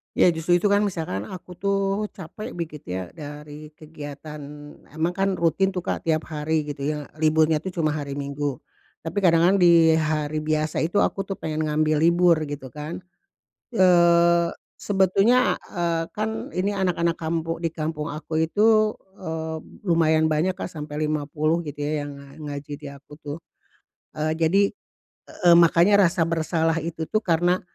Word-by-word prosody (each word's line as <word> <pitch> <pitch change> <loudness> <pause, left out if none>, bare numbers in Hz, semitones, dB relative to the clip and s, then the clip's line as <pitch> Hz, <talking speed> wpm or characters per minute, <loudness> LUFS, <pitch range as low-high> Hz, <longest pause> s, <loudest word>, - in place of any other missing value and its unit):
Ya 180 - +5
justru 165 +2 +1
itu 200 +3 +2
kan 205 - +4
misalkan 160 - -2
aku, 180 -1 -10
tuh, 200 +1 0
capek 185 +3 -8
begitu 160 - -6
ya 90 -1 -4
dari 150 0 -9
kegiatan 150 -1 -9 0.6
emang 160 +2 0
kan 195 +1 0
rutin, 185 +4 +1
tuh, 180 - -2
Kak, - - -4
tiap 155 -1 +1
hari 155 +1 -1
gitu 140 0 -4
ya 150 -1 -4
liburnya 155 0 +3
itu 175 - -8 0.2
cuma 155 - +2
hari 145 -2 -4
Minggu. 140 -1 -3 0.5
Tapi 165 +5 -2
kadang-kadang 180 +1 +4
di 170 -2 +6
hari 155 0 -1
biasa 155 0 -1
itu 170 +6 +2
aku, 195 -1 -2
tuh, 195 - -3
pengen 155 -2 -3
ngambil 155 0 +1
libur 170 0 +4
gitu 140 -3 -7
kan. 150 +4 -7 0.7
Eee, 170 -2 +5 0.3
sebetulnya 200 +5 +3
e 170 -2 -1
kan 220 +3 -3
ini 195 +3 0
anak-anak 175 -4 0
kampu 165 0 -2
di 170 - 0
kampung 155 -1 -4
aku 155 +1 -3
itu, 215 +3 +3 0.2
eee, 160 -2 -4 0.2
lumayan 160 -3 +3
banyak, 175 +5 +1
Kak, 175 - -6
sampai 150 -1 -5
50 155 +2 0
gitu 145 -3 -6
ya 145 0 -2
yang 145 - -8
nga 145 +1 -9
ngaji 145 +1 -7
di 145 - -9
aku, 140 +2 -12
tuh. 145 0 -6 0.8
Eee, 155 +1 0
jadi, 170 +5 +3 0.6
e - - -13
e - - +6
makanya 170 +4 +6
rasa 170 -1 0
bersalah 165 0 0
itu, 160 0 -4
tuh, 215 +7 0
karena 175 -1 +1
160 Hz, 160 wpm, -24 LUFS, 150-180 Hz, 0.8 s, di